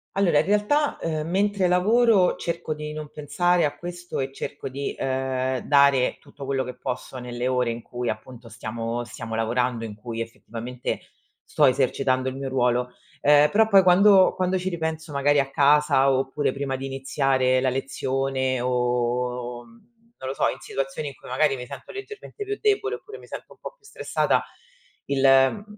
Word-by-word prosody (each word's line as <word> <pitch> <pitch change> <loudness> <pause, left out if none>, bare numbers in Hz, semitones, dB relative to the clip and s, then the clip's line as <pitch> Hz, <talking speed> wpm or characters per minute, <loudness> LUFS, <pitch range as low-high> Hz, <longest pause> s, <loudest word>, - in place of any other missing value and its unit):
Allora 185 -6 +3
in - - +3
realtà, 210 +9 +1
ehm, 155 -1 -3
mentre 195 +1 +1
lavoro 200 +2 +4
cerco 170 -2 -3
di 150 0 -6
non 155 -1 -7
pensare 170 +4 +1
a 145 -1 -2
questo 175 +3 -6
e 135 0 -2
cerco 140 0 -6
di, 140 +2 -4
ehm, 130 -1 -1
dare 140 -3 +4
tutto 140 - -11
quello 135 -1 0
che 125 -1 -7
posso 125 +1 -5
nelle 125 0 -4
ore 125 -2 +1
in 115 +1 -6
cui 120 +1 -4
appunto 115 +2 -10
stiamo 115 +1 -4
stiamo 115 -1 -8
lavorando, 115 +1 0
in 105 -2 -7
cui 115 +1 -6
effettivamente, 120 +2 -5 0.4
sto - - +2
esercitando 130 0 +1
il 130 - -7
mio 135 0 -4
ruolo. 125 -1 +1 0.3
Ehm, 150 +1 +6
però 220 +6 +4
poi 200 -3 +7
quando 190 +1 +6
quando 185 0 0
ci 185 +1 -2
ripenso 160 -2 -4
magari 145 +1 +2
a 135 -1 0
casa 140 -1 +4
oppure 135 +2 0
prima 135 -1 -3
di 135 +1 -5
iniziare 135 -1 +1
la 130 0 +1
lezione 130 0 -1
o, 125 0 -1
mhmm, 120 - -19 0.5
non 130 - -6
lo - - -2
so, - - +2
in - - -3
situazioni 135 +2 -4
in 140 - -7
cui - - -15
magari 135 +3 +2
mi 125 -1 -7
sento - - -10
leggermente 415 +1 -8
più 410 +1 -2
debole 415 +1 +1
oppure 435 -2 -11
mi - - -14
sento - - -9
un - - -26
po' - - -8
più - - -43
stressata, 420 - 0 0.6
il 140 -1 -1
mhmm, 135 +7 +5
135 Hz, 180 wpm, -24 LUFS, 125-165 Hz, 0.6 s, poi